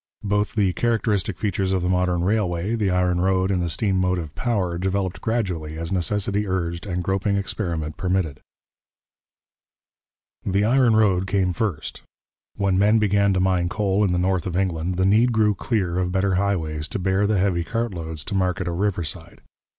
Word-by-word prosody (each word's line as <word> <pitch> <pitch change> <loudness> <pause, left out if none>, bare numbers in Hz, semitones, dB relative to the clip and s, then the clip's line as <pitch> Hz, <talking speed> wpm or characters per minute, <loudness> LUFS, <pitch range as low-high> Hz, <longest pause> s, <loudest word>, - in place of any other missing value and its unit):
Both 105 +1 0
the 100 -4 +2
characteristic 110 -5 0
features 95 -1 -1
of 95 -2 0
the - - 0
modern 90 -1 +1
railway, 95 -1 0
the 105 -4 0
iron 90 -1 +1
road 95 0 +2
and 90 -2 +1
the 85 - -1
steam 95 +2 0
motive 90 -4 -1
power, 95 -8 -1
developed 95 0 -2
gradually 90 -10 -2
as 85 +2 -4
necessity 100 +3 0
urged 85 0 -2
and 90 -1 -2
groping 95 +2 0
experiment 85 -6 -3
permitted. 90 -6 -1 2.0
The 100 +2 +1
iron 120 -1 +4
road 95 -4 +3
came 95 -2 +1
first. 90 -7 -3 0.5
When 100 -2 +1
men 105 +3 +4
began 100 -2 +3
to 95 - +1
mine 90 -2 +1
coal 100 +1 +1
in 100 - +2
the 90 - +1
north 90 0 0
of 90 -1 -2
England, 90 -2 -1
the 95 +1 +1
need 110 +5 +4
grew 110 -2 +3
clear 95 -4 -1
of 90 -1 -1
better 95 +1 +1
highways 80 -6 -1
to 120 - -4
bear 95 +2 +1
the 105 -1 +1
heavy 90 -3 +1
cart 115 +3 -2
loads 80 -3 -5
to - - -6
market 90 -1 0
or 85 - -2
riverside. 85 -3 -3
95 Hz, 175 wpm, -23 LUFS, 90-100 Hz, 2.0 s, iron